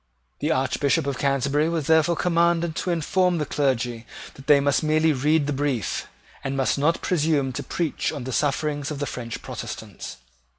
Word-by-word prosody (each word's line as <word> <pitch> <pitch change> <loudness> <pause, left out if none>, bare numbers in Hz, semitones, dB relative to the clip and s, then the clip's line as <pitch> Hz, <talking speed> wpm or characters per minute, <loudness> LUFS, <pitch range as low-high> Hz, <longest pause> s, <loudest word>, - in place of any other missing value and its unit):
The 150 - -1
Archbishop 135 0 +1
of 140 -3 -2
Canterbury 140 +3 +1
was 165 -4 -1
therefore 160 +2 +4
commanded 170 -1 +2
to - - -2
inform 175 +2 +1
the 150 - -1
clergy 125 -5 -1 0.3
that 135 - -14
they 145 -1 +7
must 140 0 +2
merely 155 0 +3
read 150 +3 +2
the 145 - -1
brief, 135 -7 -1 0.4
and 135 0 -2
must 135 - +2
not 165 +4 +1
presume 150 -6 +1
to - - -3
preach 165 -4 -2
on 145 -5 -5
the 130 +1 -4
sufferings 145 +2 0
of 150 - -4
the 145 - -2
French 115 -4 -6
Protestants. - - -7
145 Hz, 175 wpm, -24 LUFS, 135-160 Hz, 0.4 s, they